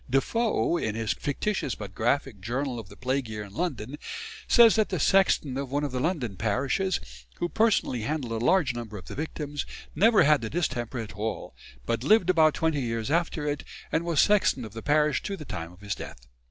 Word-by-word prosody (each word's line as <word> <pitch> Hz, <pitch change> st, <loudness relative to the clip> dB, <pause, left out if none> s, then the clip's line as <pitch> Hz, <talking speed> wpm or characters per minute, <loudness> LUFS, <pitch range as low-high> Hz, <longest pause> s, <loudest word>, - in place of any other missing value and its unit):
Defoe, 175 Hz, -, +1 dB
in 110 Hz, -9 st, -2 dB
his 115 Hz, -1 st, 0 dB
fictitious 145 Hz, -, -2 dB
but 100 Hz, -2 st, -8 dB
graphic 120 Hz, -1 st, 0 dB
"Journal 125 Hz, +4 st, -2 dB
of 105 Hz, -3 st, -10 dB
the 100 Hz, -, -12 dB
Plague 130 Hz, -1 st, -1 dB
Year 105 Hz, -1 st, -5 dB
in 100 Hz, -1 st, -12 dB
London," 140 Hz, -, -3 dB, 0.5 s
says 235 Hz, -2 st, +7 dB
that 215 Hz, -2 st, +2 dB
the 185 Hz, -, -2 dB
sexton 155 Hz, -7 st, +3 dB
of 140 Hz, -2 st, -5 dB
one 145 Hz, +1 st, 0 dB
of 145 Hz, -, -2 dB
the 125 Hz, -, -2 dB
London 125 Hz, -, -1 dB
parishes, 135 Hz, -, 0 dB, 0.4 s
who 175 Hz, -, -1 dB
personally 215 Hz, -, +1 dB
handled 120 Hz, -4 st, -2 dB
a -, -, -2 dB
large 165 Hz, -3 st, +3 dB
number 115 Hz, -3 st, -6 dB
of 90 Hz, -, -10 dB
the -, -, -8 dB
victims, 150 Hz, -1 st, -4 dB, 0.3 s
never 225 Hz, +1 st, +5 dB
had 150 Hz, -2 st, +4 dB
the 110 Hz, -, -4 dB
distemper 130 Hz, -7 st, -2 dB
at 110 Hz, -3 st, -5 dB
all, 110 Hz, +2 st, -4 dB, 0.3 s
but 115 Hz, 0 st, -1 dB
lived 185 Hz, +1 st, +5 dB
about 160 Hz, -3 st, +4 dB
twenty 160 Hz, -3 st, 0 dB
years 115 Hz, +1 st, -2 dB
after 165 Hz, -2 st, 0 dB
it, 145 Hz, 0 st, -2 dB, 0.3 s
and 165 Hz, -, +1 dB
was 170 Hz, -4 st, 0 dB
sexton 205 Hz, -, +3 dB
of 105 Hz, -, -10 dB
the 115 Hz, -, -6 dB
parish 150 Hz, 0 st, +2 dB
to 200 Hz, -1 st, -4 dB
the 155 Hz, -, -9 dB
time 85 Hz, -7 st, -5 dB
of 90 Hz, +2 st, -18 dB
his 100 Hz, -2 st, -2 dB
death. -, -, -9 dB
140 Hz, 205 wpm, -27 LUFS, 115-165 Hz, 0.5 s, says